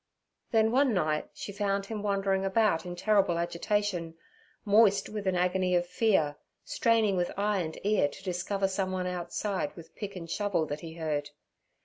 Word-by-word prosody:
Then 220 -1 +3
one 260 -2 +3
night 155 -4 0
she - - -7
found 200 -1 -1
him 215 0 -5
wandering 195 -1 0
about 195 -3 +2
in 175 - -5
terrible 195 -2 +2
agitation, 170 0 -1 0.5
moist 205 -1 +4
with 210 -2 -5
an 185 - +2
agony 180 0 +1
of 175 0 +2
fear, 175 -6 +1 0.3
straining 225 -4 +2
with 175 -1 0
eye 205 0 +1
and 160 -3 -4
ear 205 -7 +3
to 145 - -11
discover 190 +2 -1
someone 185 -1 -2
outside 180 -1 -3
with 165 -2 -13
pick 200 -2 -6
and 170 -2 -7
shovel 200 -2 0
that 145 0 -4
he 165 0 -9
heard. 150 -3 -2
190 Hz, 165 wpm, -29 LUFS, 175-205 Hz, 0.5 s, moist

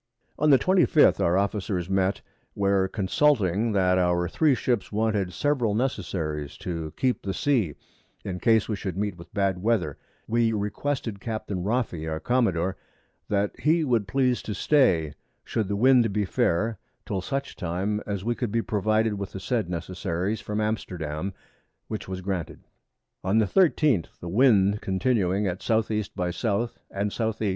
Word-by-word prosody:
On 150 - +3
the 135 - +8
25th 180 -2 +4
our 85 +2 +2
Officers 100 -3 -1
met, 95 0 +1 0.3
where 100 -1 +2
consulting 105 - +1
that 95 -2 +3
our 90 -1 +2
3 150 - +3
Ships 120 -4 -1
wanted 105 -3 0
several 125 -4 0
Necessaries 80 - -2
to 80 -3 -4
keep 130 -2 +1
the 95 -1 -3
Sea, 115 - +1 0.5
in 90 -2 -4
case 110 0 +3
we 110 - -1
should 95 -3 -5
meet 100 -2 -1
with 85 0 -13
bad 95 -3 0
Weather, 100 -9 0 0.3
we 115 0 +2
requested 110 +2 -2
Captain 105 -4 -4
Roffey 100 -8 -1
our 80 0 -3
Commodore, 95 -5 +1 0.5
that 100 0 +1
he 160 +2 +3
would 120 -8 +1
please 125 +1 +1
to 105 - -5
stay, 90 - +3 0.3
should 110 -4 -2
the 100 - -1
Wind 120 0 +4
be 105 0 0
fair, 95 +4 0 0.3
till 95 - -2
such 135 +9 -4
Time 95 +4 -2
as 100 -2 -3
we 120 +2 0
could 120 -3 -3
be 115 +1 0
provided 110 0 +1
with 100 0 -5
the 95 - -5
said 110 -2 -1
Necessaries 90 +3 -3
from 105 0 -3
Amsterdam, 90 -6 -3 0.6
which 110 -2 -5
was 95 -1 -5
granted. 95 -3 -4 0.6
On 95 +4 +2
the 110 - +4
13th 150 - +2
the 85 - -7
Wind 105 -2 +4
continuing 95 0 +1
at 90 +3 -4
S. 110 -1 +2
E. 110 0 +1
by 90 -2 -1
S. 90 - -7 0.5
and 100 +1 -2
S. 110 -1 0
E. 105 - 0
100 Hz, 165 wpm, -26 LUFS, 95-115 Hz, 0.6 s, the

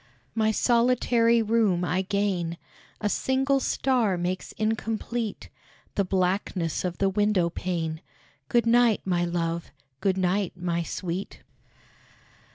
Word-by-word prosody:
My 220 -1 +2
solitary 235 0 +3
room 210 -5 +2
I 180 +3 +1
gain. 190 -4 -1 0.4
A 210 - +1
single 270 +5 +1
star 245 -8 +1
makes 180 +1 -3
incomplete 225 +1 -2 0.4
The 200 - +1
blackness 185 -2 -1
of 180 -2 -3
the 195 - +2
window 195 -3 +2
pane. 165 -3 -3 0.5
Good 240 -2 +3
night, 235 -1 +4
my 175 -2 +1
love! 170 -1 -2 0.3
good 190 +2 +1
night, 185 +1 0
my 175 -1 -1
sweet! 180 +2 -5
195 Hz, 115 wpm, -26 LUFS, 175-225 Hz, 0.5 s, night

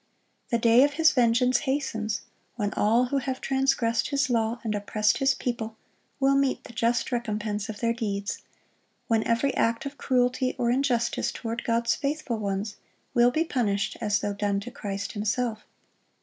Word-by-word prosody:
The 235 - +2
day 230 +2 +5
of 290 0 +2
His 320 +1 +5
vengeance 250 0 +3
hastens, 220 -6 -1 0.3
when 210 -3 -2
all 230 +4 +3
who 275 +2 0
have 260 0 -3
transgressed 265 -4 +1
His 280 -2 +1
law 230 0 +1
and 220 -2 -1
oppressed 210 +1 +1
His 270 0 +3
people 225 -3 -4 0.4
will 275 0 +4
meet 275 -1 +1
the 235 - -12
just 235 +3 0
recompense 215 -3 -2
of 210 -1 -6
their 230 0 +2
deeds; 200 -4 -3 0.7
when 225 -2 +2
every 235 +4 +1
act 230 +2 0
of 280 +1 -7
cruelty 255 0 +1
or 235 -1 +1
injustice 250 -2 +1
toward 230 -1 -5
God's 230 0 +1
faithful 280 -5 -2
ones 200 0 -3 0.4
will 240 0 +5
be 310 +6 +1
punished 210 -9 0
as 210 -2 +1
though 205 - -1
done 200 0 0
to 245 +4 -8
Christ 200 -3 -4
Himself. 220 +1 -2
235 Hz, 165 wpm, -26 LUFS, 215-255 Hz, 0.7 s, day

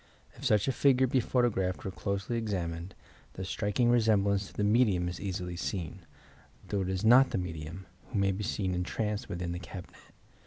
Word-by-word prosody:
If - - -14
such 110 -5 +3
a - - +3
figure 130 -1 +4
be 130 +1 +2
photographed 115 -7 0
or 95 - -2
closely 100 +4 -3
examined, 90 -5 -3 0.4
the 95 - -6
Btriking 105 +5 +1
resemblance 100 -4 +3
to - - -15
the 105 - -1
medium 105 -5 +3
is 90 0 -5
easily 90 -3 -3
seen, 90 0 -4 0.7
though 100 -1 0
it 95 - -2
is 95 +2 -1
not 130 +4 +7
the - - -1
medium, 85 +1 -5 0.2
who 115 - -4
may 100 0 +3
be 95 +3 -3
seen 95 -1 -1
entranced 105 +4 -2
witliin 85 0 -3
the 85 - -4
cabinet. 90 0 -10
100 Hz, 185 wpm, -30 LUFS, 90-110 Hz, 0.7 s, not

